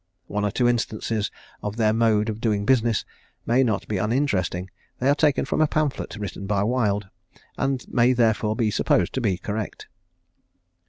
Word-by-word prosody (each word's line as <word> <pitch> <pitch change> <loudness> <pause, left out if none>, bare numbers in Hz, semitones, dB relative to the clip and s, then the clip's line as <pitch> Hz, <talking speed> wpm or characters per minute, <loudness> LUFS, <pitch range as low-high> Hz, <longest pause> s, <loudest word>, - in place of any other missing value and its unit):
One 105 +1 -2
or 105 - +2
two 120 +4 +1
instances 110 -3 -1 0.3
of 105 0 -4
their 110 -2 +2
mode 110 -1 +2
of 110 0 -4
doing 105 -3 0
business 120 -3 +2 0.4
may 125 +3 +3
not 110 -5 -1
be 105 -3 -1
uninteresting. 95 - 0 0.3
They 130 - -1
are 140 - +6
taken 145 -1 +2
from - - 0
a 155 - +5
pamphlet 150 -2 -1
written 100 -2 -6
by 100 -1 +1
Wild, 105 -4 0 0.5
and 135 -2 -1
may 120 +1 +3
therefore 110 -3 +2
be 110 -2 +1
supposed 90 -3 +1
to 130 - -1
be 100 -6 +1
correct. 105 +3 -5
110 Hz, 170 wpm, -24 LUFS, 105-125 Hz, 0.5 s, are